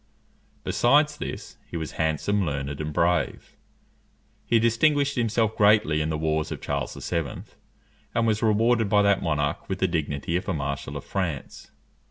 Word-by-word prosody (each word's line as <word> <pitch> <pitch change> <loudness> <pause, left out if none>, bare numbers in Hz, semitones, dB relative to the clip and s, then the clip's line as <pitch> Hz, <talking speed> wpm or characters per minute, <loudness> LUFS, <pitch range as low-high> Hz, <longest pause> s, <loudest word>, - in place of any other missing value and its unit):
Besides 150 +4 +3
this, - - -7
he 85 - -4
was 80 -2 -4
handsome, 80 +6 0
learned, 70 -2 -3
and 75 0 -3
brave. 85 +3 0 0.9
He 115 - +4
distinguished 140 +6 +3
himself 115 -2 +1
greatly 105 -7 +4
in 75 - -1
the 80 - -1
wars 80 0 -1
of - - -4
Charles 70 -3 -3
VII., 85 -7 -3 0.7
and 115 0 +2
was 110 -2 +1
rewarded 115 0 +3
by 105 0 +4
that 100 -1 +3
monarch 75 -3 -1
with 95 - -1
the 95 - +1
dignity 80 -1 -2
of 90 - -5
a 95 - 0
marshal 70 -1 -4
of 70 - -9
France. 90 -8 -4
90 Hz, 160 wpm, -25 LUFS, 75-110 Hz, 0.9 s, He